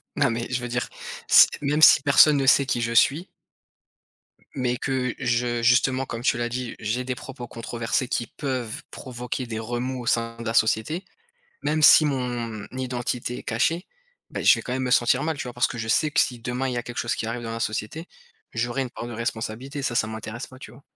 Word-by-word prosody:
non, 140 -3 +2
mais 115 +1 -3
je 125 0 -1
veux 120 - -4
dire, 125 +1 -2 0.4
s - - +9
même 150 +2 0
si 155 - +8
personne 145 +1 +6
ne 135 - 0
sait 140 0 +5
qui 120 -2 -1
je 115 0 -1
suis 150 +9 +3 1.3
mais 125 -2 -1
que 130 0 -1
je 120 -2 0
justement, 130 +2 +3
comme 115 -2 -6
tu 120 - +2
l'as 120 0 -2
dit, 125 0 -4
j'ai 115 +4 -2
des 125 0 -2
propos 125 -1 -9
controversés 115 +3 -2
qui 120 - -1
peuvent 130 -6 -4
provoquer 125 0 -5
des 110 -1 -4
remous 120 +3 -3
au - - -8
sein 115 -1 0
de 115 - -7
la 115 - -2
société, 115 - +1 0.6
même 155 +1 0
si 155 - +8
mon 120 -6 -3
identité 125 -1 -3
est - - -9
cachée, 160 - 0 0.4
bah, - - -4
je - - +7
vais - - -6
quand 125 - -5
même 130 - -2
me 130 - -1
sentir 125 +2 +3
mal, 155 -1 -2
tu - - -3
vois, 125 - -7
parce 120 - +2
que 120 - -7
je 115 0 -4
sais 150 +6 +2
que - - +3
si 125 - 0
demain 125 +3 -3
il 125 - -2
y - - -4
a 120 - -1
quelque 120 +1 -8
chose 120 0 0
qui - - -4
arrive 120 +1 -4
dans 115 -1 -5
la 115 - -5
société, 110 - -4 0.4
j'aurai 120 +3 -1
une 130 - -5
part 120 - -7
de - - -7
responsabilité, 115 +4 -4
ça, 125 - -1
ça 110 - +2
m'intéresse 110 +2 -6
pas, 130 - -15
tu - - -11
vois? 130 +3 -17
125 Hz, 230 wpm, -24 LUFS, 115-130 Hz, 1.3 s, s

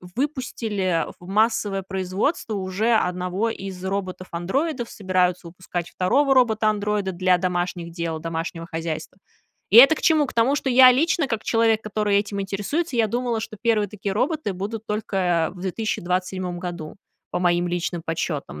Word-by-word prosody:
выпустили 210 - -2
в 175 - -13
массовое 210 -1 +1
производство 195 - -1
уже 200 +4 0
1 180 +2 0
из 190 -4 -7
роботов-андроидов, 195 - -3
собираются 185 -3 0
выпускать 175 0 -5
2 270 +10 +2
робота-андроида 210 -4 +2
для 185 0 +2
домашних 175 -1 -2
дел, 170 -2 -3
домашнего 165 +1 -4
хозяйства. 160 +1 -4 0.5
И 205 - +5
это 275 +6 +9
к - - -7
чему? 310 -3 +4
К - - -8
тому, 235 +4 +3
что 270 - -1
я 255 0 +8
лично, 315 +3 +2
как 225 -2 -2
человек, 225 -1 +2
который 210 -1 +1
этим 200 0 -3
интересуется, 205 - -2
я 225 -2 +3
думала, 240 0 -1
что 220 0 -7
1 220 -4 +2
такие 200 -1 -4
роботы 265 - -1
будут 210 +4 -5
только 185 -6 0
в 180 - -11
2027 185 -2 -2
году, 175 -4 -6 0.4
по - - -1
моим 175 0 +2
личным 175 -1 -2
подсчётам. 155 - -3
195 Hz, 150 wpm, -23 LUFS, 180-225 Hz, 0.5 s, это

